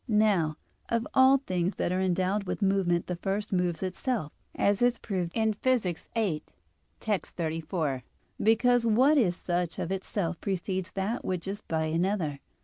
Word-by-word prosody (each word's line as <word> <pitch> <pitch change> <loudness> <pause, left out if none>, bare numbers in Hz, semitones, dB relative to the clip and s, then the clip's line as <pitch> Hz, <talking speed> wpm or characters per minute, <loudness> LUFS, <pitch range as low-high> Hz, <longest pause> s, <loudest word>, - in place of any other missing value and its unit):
Now, 205 -9 +2 0.3
of 230 0 +1
all 265 +1 +7
things 185 -8 -1
that - - -1
are 185 +1 +1
endowed 190 +2 +1
with 200 - -2
movement 190 -3 +2
the 180 - -4
first 200 +3 -2
moves 180 -2 0
itself, 190 - -2 0.2
as 200 +1 +2
is 245 0 +3
proved 180 -5 -3
in 220 -1 +2
Phys. 255 +3 +2 0.3
viii, 195 -10 0 0.6
text. 205 -6 -2
34, 160 -4 -2 0.4
because, 235 +3 +4
what 255 +7 +5
is 180 -8 +2
such 175 -1 -2
of 175 - -3
itself 190 -2 -2
precedes 190 0 -2
that 200 +5 -2
which 185 -1 -3
is 200 +1 -4
by 160 -1 -1
another. 165 -2 0
190 Hz, 155 wpm, -28 LUFS, 175-220 Hz, 0.6 s, all